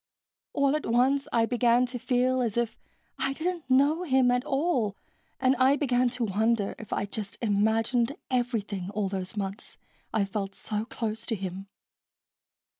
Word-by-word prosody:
All 280 +1 +2
at 305 - -2
once 260 +4 +2
I 230 -1 +3
began 240 +1 +3
to 250 0 -5
feel 255 +1 +1
as 235 -2 -1
if 235 -2 0 0.4
I 270 - 0
didn't 335 -1 -3
know 285 +6 +4
him 265 -7 +3
at 245 0 +1
all 270 - 0 0.4
and 260 0 +3
I 260 +2 +5
began 250 -4 +2
to 245 - -1
wonder 220 0 +1
if 215 - -10
I'd 200 - -2
just 210 -2 -5
imagined 225 +4 +1 0.2
everything 215 -7 -1
all 205 -2 0
those 190 +1 -5
months 195 +2 -5 0.3
I 215 -3 +1
felt 195 0 -4
so 210 0 -3
close 225 -2 -4
to 230 - 0
him. 190 0 -6
235 Hz, 160 wpm, -28 LUFS, 210-260 Hz, 0.4 s, I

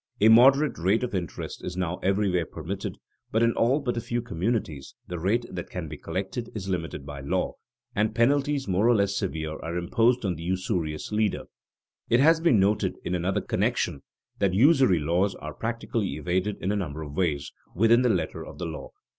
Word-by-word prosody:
A 110 - +6
moderate 135 - +6
rate 95 +8 +2
of 125 - -3
interest 90 -5 -4
is 90 0 -5
now 90 -1 -1
everywhere 95 -4 +1
permitted; - - -5 0.3
but 110 +1 +2
in 115 0 +3
all 130 +6 +2
but 125 -4 -2
a - - -1
few 120 +2 -2
communities 95 - -3
the 90 -1 -5
rate 110 +8 +1
that - - -6
can - - -5
be - - -7
collected 100 +5 -4
is 95 -3 -5
limited 80 -6 -3
by 70 -1 -7
law, 70 - -1 0.4
and 110 +1 +1
penalties 140 +3 +2
more 95 +4 +2
or 120 - +5
less 100 -2 +1
severe 80 -6 -3
are 85 +1 -4
imposed 115 +7 +2
on 95 - +1
the 80 - -9
usurious 90 -3 -2
lender. 105 -1 0 0.7
It 120 - +4
has 160 +4 +5
been 165 -11 +4
noted 100 +2 +2
in - - -2
another 90 +2 0
connection 70 - -1 0.4
that 95 -2 +2
usury 130 - +5
laws 85 +6 +1
are 75 0 -7
practically 115 -5 -2
evaded 90 +6 -1
in 95 - +1
a - - 0
number 80 -6 -3
of 75 -1 -8
ways 75 -6 -1 0.2
within 115 +5 +5
the 125 - +3
letter - - -1
of - - -11
the 90 - -4
law. 80 -2 -6
100 Hz, 195 wpm, -26 LUFS, 85-115 Hz, 0.7 s, A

